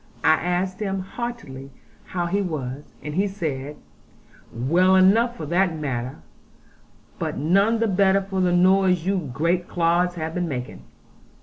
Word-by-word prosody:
I 160 Hz, -, +6 dB
asked 180 Hz, +3 st, -1 dB
him 195 Hz, -2 st, -2 dB
heartily 190 Hz, -, -7 dB, 0.4 s
how 175 Hz, -2 st, -3 dB
he 195 Hz, +4 st, 0 dB
was, 145 Hz, -6 st, -5 dB
and 150 Hz, -, -5 dB
he 195 Hz, +5 st, +1 dB
said, 150 Hz, -7 st, -4 dB, 0.8 s
'Well 170 Hz, +11 st, +3 dB
enough, 225 Hz, +6 st, +4 dB
for 155 Hz, -, -5 dB
that 175 Hz, +1 st, +1 dB
matter; 130 Hz, -, -4 dB, 1.0 s
but -, -, -3 dB
none 195 Hz, +10 st, +3 dB
the 230 Hz, 0 st, +1 dB
better 195 Hz, 0 st, +3 dB
for 190 Hz, -1 st, -2 dB
the 180 Hz, -1 st, +2 dB
noise 180 Hz, -1 st, +3 dB
you 185 Hz, -6 st, -1 dB
great 170 Hz, +6 st, 0 dB
clods 175 Hz, +1 st, +1 dB
have 160 Hz, -1 st, -4 dB
been 175 Hz, 0 st, -1 dB
making.' 125 Hz, -4 st, -6 dB
180 Hz, 145 wpm, -23 LUFS, 155-195 Hz, 1.0 s, I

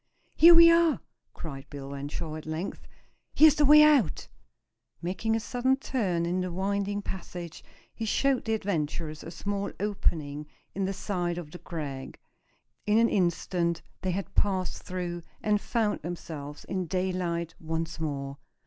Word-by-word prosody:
"Here 340 Hz, +1 st, +8 dB
we 335 Hz, 0 st, +9 dB
are!" 335 Hz, -2 st, +4 dB, 0.4 s
cried 135 Hz, -5 st, -8 dB
Bill 140 Hz, -1 st, -7 dB
Renshaw 145 Hz, +3 st, -5 dB
at 155 Hz, 0 st, -8 dB
length. 160 Hz, +5 st, -5 dB, 0.5 s
"Here's 310 Hz, -1 st, +8 dB
the 295 Hz, 0 st, +2 dB
way 300 Hz, +2 st, +9 dB
out!" 280 Hz, -, +3 dB, 0.7 s
Making 195 Hz, +6 st, -1 dB
a -, -, +1 dB
sudden 250 Hz, +3 st, +1 dB
turn 195 Hz, -11 st, -1 dB
in 180 Hz, +2 st, 0 dB
the 185 Hz, -1 st, -3 dB
winding 200 Hz, +2 st, -1 dB
passage 175 Hz, -3 st, -7 dB, 0.3 s
he 225 Hz, -, -4 dB
showed 270 Hz, +4 st, +1 dB
the 225 Hz, -1 st, +1 dB
adventurers 155 Hz, -6 st, -3 dB
a -, -, -7 dB
small 200 Hz, +3 st, -3 dB
opening 155 Hz, -7 st, -1 dB, 0.3 s
in 195 Hz, 0 st, -1 dB
the 190 Hz, -, -1 dB
side 175 Hz, -3 st, -2 dB
of 165 Hz, -4 st, -7 dB
the 175 Hz, -, -9 dB
crag. 140 Hz, -6 st, -6 dB, 0.7 s
In 210 Hz, +1 st, +4 dB
an 230 Hz, 0 st, +5 dB
instant 175 Hz, -2 st, 0 dB, 0.2 s
they 185 Hz, -, -1 dB
had 185 Hz, +2 st, -3 dB
passed 190 Hz, -3 st, 0 dB
through, 175 Hz, -1 st, -4 dB, 0.2 s
and 210 Hz, -1 st, +2 dB
found 225 Hz, -4 st, 0 dB
themselves 150 Hz, -3 st, -7 dB
in 185 Hz, -2 st, -3 dB
daylight 175 Hz, -2 st, -1 dB
once 160 Hz, 0 st, -3 dB
more. 140 Hz, -3 st, -3 dB
180 Hz, 150 wpm, -28 LUFS, 160-210 Hz, 0.7 s, we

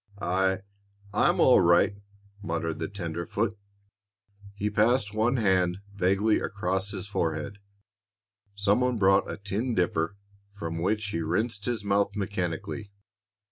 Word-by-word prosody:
"I 95 Hz, 0 st, +1 dB, 0.5 s
I'm 105 Hz, -, +3 dB
all 125 Hz, -, +6 dB
right," 85 Hz, +3 st, +4 dB, 0.5 s
muttered 80 Hz, -4 st, -3 dB
the -, -, -2 dB
tenderfoot. 95 Hz, +3 st, -3 dB, 1.0 s
He 105 Hz, +1 st, -2 dB
passed 105 Hz, 0 st, +2 dB
one 115 Hz, +4 st, +2 dB
hand 95 Hz, -4 st, +2 dB, 0.2 s
vaguely 100 Hz, +3 st, +2 dB
across 95 Hz, 0 st, -2 dB
his 100 Hz, -2 st, -6 dB
forehead. 85 Hz, 0 st, -2 dB, 1.0 s
Some 100 Hz, +3 st, +2 dB
one 125 Hz, -1 st, +1 dB
brought 95 Hz, -1 st, +4 dB
a -, -, -5 dB
tin 105 Hz, +5 st, -2 dB
dipper, 90 Hz, 0 st, 0 dB, 0.4 s
from 85 Hz, -4 st, -5 dB
which 105 Hz, +4 st, 0 dB
he 85 Hz, -, -2 dB
rinsed 100 Hz, +6 st, -1 dB
his 120 Hz, -4 st, -2 dB
mouth 100 Hz, 0 st, +1 dB
mechanically. 100 Hz, +1 st, -3 dB
100 Hz, 125 wpm, -27 LUFS, 90-105 Hz, 1.0 s, all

